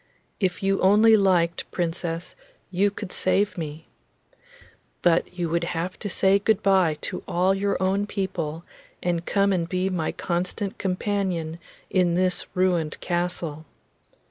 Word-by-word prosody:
If 190 0 -1
you 195 0 +1
only 215 +4 +6
liked, 180 -5 +2
Princess, 170 0 -3 0.4
you 195 +3 +3
could 200 -1 -7
save 205 +1 +1
me. 160 -2 -6 1.2
But 175 +1 +2
you 175 -1 0
would 170 +1 0
have 180 +3 -3
to 205 - -3
say 195 +1 +3
good 210 0 +1
bye 185 -6 +3
to - - -4
all 185 +2 +2
your 200 +1 0
own 195 +2 +1
people 170 -6 -3 0.4
and 175 -1 -1
come 200 -1 +2
and 170 -2 -1
be 185 +1 0
my 165 -4 -1
constant 180 +3 -3
companion 185 -4 -1 0.3
in 180 -2 +2
this 185 0 0
ruined 175 -4 +1
castle. 175 -3 -2
180 Hz, 140 wpm, -25 LUFS, 170-195 Hz, 1.2 s, only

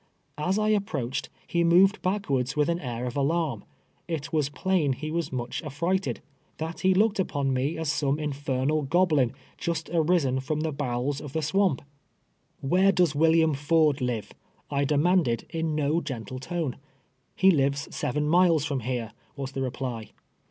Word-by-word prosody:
As 180 +6 +1
I 215 0 +1
approached, 140 - -1 0.2
ho 170 0 +3
moved 185 +5 +5
backwards 145 -10 -1
with 150 +2 +2
an 170 0 0
air 125 -4 -4
of 125 - -4
alarm. 145 -4 0 0.4
It 165 -1 -4
was 150 -3 +1
plain 170 -3 +1
he 155 +4 -5
was 170 0 -2
much 120 -2 -3
affrighted 170 +6 -1 0.2
— - - -39
that 160 +1 -5
he 190 0 +3
looked 210 +1 +3
upon 140 -7 0
me 135 +5 -1
as 160 -2 -1
some 145 -2 0
infernal 145 0 -1
goblin, 150 -4 +2 0.3
just 165 -1 -3
arisen 160 -6 +2
from 150 +3 -2
the 160 0 -1
bowels 140 0 -2
of 145 -3 -8
the 160 - -1
swamp! 185 -2 +1 0.8
""Where 185 +8 +4
does 175 -6 +2
William 160 +1 +4
Ford 150 0 +2
live? 120 -4 -2 0.2
" - - -33
I 140 0 +1
demanded, 150 -4 +2
in 160 -2 -1
no 150 +3 +1
gentle 130 -4 -6
tone. 160 -2 -3 0.3
" 130 -1 -44
He 190 0 +5
lives 140 -2 0
seven 150 +3 -1
miles 165 -2 +4
from 140 -3 -1
here," 120 -2 -3 0.2
was 135 -1 -5
the 135 - -4
reply. 125 -4 -4
150 Hz, 170 wpm, -27 LUFS, 135-170 Hz, 0.8 s, moved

